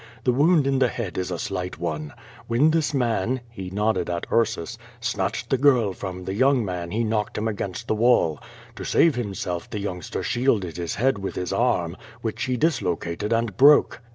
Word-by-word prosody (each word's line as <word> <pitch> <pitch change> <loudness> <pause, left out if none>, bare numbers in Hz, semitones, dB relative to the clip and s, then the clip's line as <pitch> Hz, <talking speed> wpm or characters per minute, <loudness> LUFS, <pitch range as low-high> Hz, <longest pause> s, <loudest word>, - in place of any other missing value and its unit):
The 125 - +3
wound 150 +3 +4
in 135 -1 +1
the 130 - +4
head 115 -7 -5
is 90 - -2
a 90 - -3
slight 90 +1 -4
one. 75 -3 -3 0.4
AVhen 135 +7 +4
this 160 -2 +1
man" 125 -2 0
(he 95 -5 -7
nodded 100 -1 0
at 85 -1 -2
Ursus) 115 -3 0 0.2
"snatched 115 0 -2
the 135 - +2
girl 125 -8 +4
from 90 -1 -6
the 95 - -3
young 130 +2 +3
man 90 -2 -4
he 110 +5 -1
knocked 110 -1 -1
him 110 +1 -1
against 105 +1 -4
the - - +1
wall. 110 - +3 0.4
To - - -6
save 165 - +4
him 110 -6 -3
self 90 -2 -4
the - - -4
youngster 95 -2 -4
shielded 105 - 0
his 85 -1 -3
head 125 +1 +1
with 95 - -4
his 90 - -3
arm, 90 -8 +1 0.3
which 115 +1 -2
he 125 -1 -1
dislocated 105 - -1
and 115 -3 0
broke." 145 -3 +6
110 Hz, 195 wpm, -24 LUFS, 90-125 Hz, 0.4 s, broke